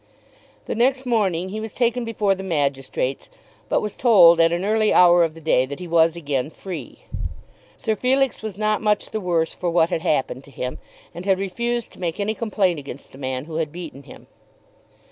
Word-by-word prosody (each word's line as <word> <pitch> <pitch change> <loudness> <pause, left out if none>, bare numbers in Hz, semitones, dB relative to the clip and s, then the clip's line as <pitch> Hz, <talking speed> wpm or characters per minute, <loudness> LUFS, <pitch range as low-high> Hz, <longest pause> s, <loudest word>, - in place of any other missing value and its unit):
The - - -3
next 260 +3 +1
morning 190 -7 0
he 215 +3 -4
was 220 -1 -6
taken 245 0 +1
before 215 -3 +1
the 190 - -6
magistrates, 140 -6 -2 0.4
but - - +2
was 210 - -4
told 170 -9 +6
at 165 0 +4
an 175 +3 -1
early 215 0 +2
hour 175 -1 +6
of 165 -1 -1
the - - -10
day 155 -5 +2
that 140 +1 -7
he 180 - -7
was 165 0 +3
again 145 -4 -2
free. 160 - -8 0.7
Sir 220 - -1
Felix 265 +2 +1
was 215 -3 -6
not 215 0 0
much 210 -1 0
the 215 - -3
worse 170 -3 0
for 180 - -2
what 170 0 +2
had 165 - -1
happened 135 -6 -1
to - - -15
him, 125 -2 -5 0.3
and 175 - -7
had 195 -1 +3
refused 235 +5 -2
to - - -15
make 170 0 -2
any 205 +2 0
complaint 200 -7 0
against 140 -1 -10
the 135 - -14
man 130 0 -3
who 160 0 -6
had 160 -2 -1
beaten 165 -5 -8
him. - - -14
180 Hz, 205 wpm, -22 LUFS, 160-215 Hz, 0.7 s, told